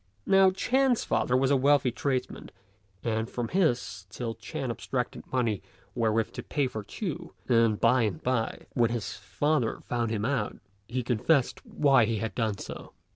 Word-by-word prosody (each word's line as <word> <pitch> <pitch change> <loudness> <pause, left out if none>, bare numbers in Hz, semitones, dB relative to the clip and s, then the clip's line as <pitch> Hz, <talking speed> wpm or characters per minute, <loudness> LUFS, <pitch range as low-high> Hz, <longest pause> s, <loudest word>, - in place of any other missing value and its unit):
Now 195 0 +6
Ch'ên's 250 +6 +2
father 125 - +1
was 135 +1 +2
a - - +5
wealthy 135 -1 +4
tradesman, 130 +1 -2 0.5
and 110 0 -1
from 120 -2 -3
his 120 - 0
till 115 +3 -4
Ch'ên 125 +4 -4
abstracted 125 +1 -4
money 115 -6 0 0.3
wherewith 110 -1 +1
to - - -6
pay 145 -2 -1
for 110 -4 -4
Ch'u; 175 - -5
and 115 -3 +3
by 130 0 +4
and 100 -8 -1
by, 125 -3 -1
when 120 -2 +3
his 115 -5 -3
father 145 -6 -1
found 120 -2 -1
him 110 -1 -1
out, 125 -5 -1 0.3
he 125 +1 -2
confessed 125 +4 +1
why 135 -5 +4
he 115 +1 -1
had 110 -1 -3
done 110 -3 -1
so. - - -8
125 Hz, 165 wpm, -28 LUFS, 110-140 Hz, 0.5 s, Now